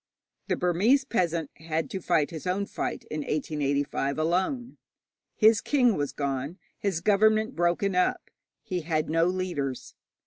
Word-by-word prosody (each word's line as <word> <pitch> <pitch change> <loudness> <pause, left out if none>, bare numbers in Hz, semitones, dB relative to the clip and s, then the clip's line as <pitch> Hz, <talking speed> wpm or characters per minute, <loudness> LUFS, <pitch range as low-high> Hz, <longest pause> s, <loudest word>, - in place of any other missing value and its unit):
The - - +1
Burmese 205 +11 +3
peasant 170 - -1
had 160 0 -2
to 190 -4 -4
fight 165 -3 +1
his 165 +2 -6
own 195 +3 0
fight - - -4
in 155 - -2
1885 145 -2 -1
alone. 185 - -1 0.6
His 220 -1 +5
king 250 -7 +3
was 145 -1 -1
gone, 140 +3 -3 0.2
his 190 -5 -1
government 215 +4 +3
broken 175 +3 +1
up, 180 - 0 0.3
he 180 -1 -3
had 155 -1 -1
no 165 +1 +3
leaders. 175 -8 -3
175 Hz, 140 wpm, -27 LUFS, 155-200 Hz, 0.6 s, His